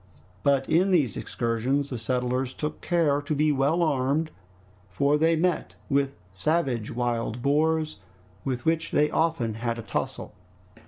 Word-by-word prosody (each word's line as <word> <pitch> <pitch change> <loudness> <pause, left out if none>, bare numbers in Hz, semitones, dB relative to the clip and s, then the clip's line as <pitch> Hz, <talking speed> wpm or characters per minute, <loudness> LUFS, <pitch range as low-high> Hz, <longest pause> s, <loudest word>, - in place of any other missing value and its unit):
But 140 -1 +2
in 180 +4 +3
these 150 - +2
excursions 125 +5 -1
the 125 - -2
settlers 125 +2 -1
took 150 0 -4
care 155 -5 +2
to 145 +1 -2
be 150 +1 +3
well 145 +5 +2
armed, 150 +1 +1 0.6
for 140 +11 +2
they 165 +2 +3
met 175 +1 0 0.2
with 140 0 +1 0.2
savage 120 - 0
wild 120 -1 -2
boars, 155 +1 +1 0.5
with 125 -3 -3
which 165 0 +1
they 150 +1 +2
often 160 -9 +1
had 115 +1 -2
a 115 - -6
tussle. 100 - -4
140 Hz, 145 wpm, -26 LUFS, 120-155 Hz, 0.6 s, in